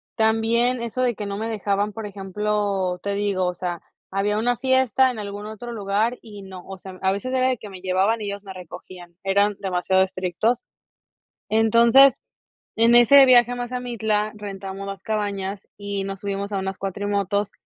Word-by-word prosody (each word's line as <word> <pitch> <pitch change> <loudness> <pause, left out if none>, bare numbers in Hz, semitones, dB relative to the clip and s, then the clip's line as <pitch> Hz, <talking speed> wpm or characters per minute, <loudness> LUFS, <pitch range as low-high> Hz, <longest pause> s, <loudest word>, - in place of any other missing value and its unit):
también 230 +2 +2
eso 235 +2 -3
de 250 -1 +2
que 210 - -5
no 200 0 -4
me 225 +1 -3
dejaban, 205 -1 -1
por 220 +1 -7
ejemplo, 200 -1 -2
te 200 0 -1
digo, 200 -2 0
o 180 - -1
sea, 175 -1 -4 0.3
había 205 +2 0
una 245 +2 +1
fiesta 260 0 +3
en 235 - -7
algún 205 0 -6
otro 220 +3 -7
lugar 215 +3 -1
y 210 -3 -11
no, 185 -2 -10
o 195 - -8
sea, 185 0 -11
a 190 - +2
veces 230 +7 -3
era 260 0 +2
el 250 - -3
que - - -9
me 185 -2 -10
llevaban 190 +4 +1
y 210 - -4
ellos 200 0 -5
me 195 - -9
recogían, 180 -1 -11
eran 200 +1 +2
demasiado 190 0 +1
estrictos. 190 +6 -1 0.9
Entonces, 230 +5 +6 0.6
en 230 +1 +4
ese 255 +4 +8
viaje 245 -1 +6
a - - -3
Mazamitla 235 -4 -2
rentamos 195 -1 -7
las 195 -1 -7
cabañas 200 -2 -3
y 200 -1 -4
nos 195 -1 -6
subimos 200 0 -3
a 200 - -1
unas 190 0 -4
cuatrimotos. 200 +1 -1
205 Hz, 180 wpm, -23 LUFS, 195-225 Hz, 0.9 s, ese